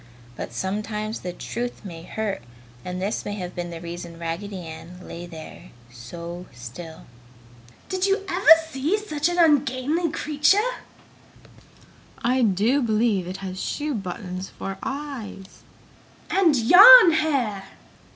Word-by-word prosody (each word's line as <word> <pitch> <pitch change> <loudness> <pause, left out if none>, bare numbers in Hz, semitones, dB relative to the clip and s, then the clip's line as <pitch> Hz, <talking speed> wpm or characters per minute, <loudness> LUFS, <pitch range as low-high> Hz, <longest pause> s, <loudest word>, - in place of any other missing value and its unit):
But - - -6
sometimes 210 - -3
the 180 - -5
truth 240 +4 -6
may 170 -4 -8
hurt 210 - -4 0.4
and 180 0 -5
this 200 +4 -2
may 205 - -4
have 180 -3 -6
been 175 0 -5
the 170 -1 -7
reason 170 0 -8
Raggedy 175 +3 -5
Ann 160 +3 -10
lay 175 +1 -8
there 165 +1 -11 0.2
so 170 +9 -9
still. 135 +8 -10 0.8
"Did 375 +1 -1
you 395 0 0
ever 380 +1 +1 0.2
see 310 +7 -1
such 315 -7 -2
an 350 - -3
ungainly 300 0 +2
creature!" 300 +4 +2 1.7
"I 255 +2 +2
do 225 +6 +2
believe 215 -5 +1
it 185 +1 -5
has 185 0 -5
shoe 295 0 -3
buttons 185 -3 -6
for 195 0 -7
eyes!" 265 -9 -7 0.7
"And 355 -6 +4
yarn 365 - +9
hair!" 270 -11 0
210 Hz, 130 wpm, -24 LUFS, 175-290 Hz, 1.7 s, yarn